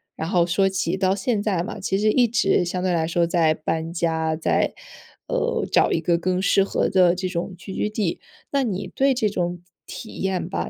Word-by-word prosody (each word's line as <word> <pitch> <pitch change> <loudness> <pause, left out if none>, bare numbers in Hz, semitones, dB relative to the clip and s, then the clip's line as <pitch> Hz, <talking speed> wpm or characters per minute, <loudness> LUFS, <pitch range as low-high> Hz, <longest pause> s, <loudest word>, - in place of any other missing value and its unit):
然 160 - -4
后 175 -2 +3
说 195 +2 +2
起 185 -1 -1
到 190 0 +1
现 205 +1 -1
在 190 -5 0
嘛， 195 - -6
其 195 0 -1
实 215 +1 +2
一 245 0 +4
直 195 -5 +2
相 180 +1 -3
对 185 -1 +1
来 160 -1 +1
说 170 0 +1
在 165 -2 +2
搬 160 +1 -3
家， 160 -2 0
在 160 - 0 0.5
呃， - - -1
找 - - +4
一 - - +1
个 170 - +1
更 180 +1 0
适 195 +1 +3
合 - - 0
的 180 -2 +4
这 185 0 -2
种 180 +1 -4
聚 190 +1 -9
居 - - -1
地。 210 -5 -2 0.3
那 280 -1 +2
你 195 -4 -3
对 270 -1 +2
这 215 -4 +1
种 175 -2 -3 0.2
体 220 - -9
验 190 -2 -1
吧， 185 - -3
185 Hz, 230 characters per minute, -23 LUFS, 170-200 Hz, 0.5 s, 一